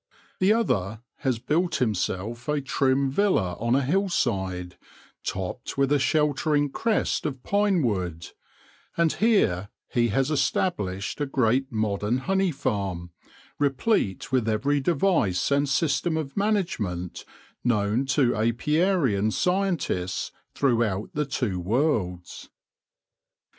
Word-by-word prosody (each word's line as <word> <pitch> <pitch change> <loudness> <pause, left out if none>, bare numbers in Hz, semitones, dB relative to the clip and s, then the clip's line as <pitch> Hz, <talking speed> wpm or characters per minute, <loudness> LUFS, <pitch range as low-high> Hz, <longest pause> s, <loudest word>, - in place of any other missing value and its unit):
The 185 +2 +4
other 110 - 0 0.2
has 130 -3 0
built 170 +9 0
himself 115 +1 -2
a 150 0 +1
trim 135 0 +1
villa 135 - +1
on 115 +2 +1
a 140 - +2
hillside, 105 - -1 0.5
topped 95 +6 -4
with 140 0 +2
a 145 - +4
sheltering 145 +1 +1
crest 225 +6 0
of 130 -4 -4
pine 200 -4 +2
wood; 90 -7 -2 0.7
and 170 -2 +3
here 105 - +2 0.2
he 120 -1 +2
has 135 +6 0
established 120 - -1
a 145 - 0
great 130 0 +1
modern 110 +1 0
honey 190 +6 +1
farm, 95 - -3 0.5
replete 140 - 0
with 125 -4 +1
every 140 +7 +1
device 165 - +1
and 140 0 +2
system 160 +3 +1
of 145 -4 -4
management 145 - -1 0.4
known 115 +2 +1
to 135 -3 +2
apiarian 120 - +1
scientists 180 - -1 0.2
throughout 115 -7 +1
the 150 0 0
two 115 -8 -2
worlds. 95 - -1
130 Hz, 115 wpm, -25 LUFS, 105-155 Hz, 0.7 s, The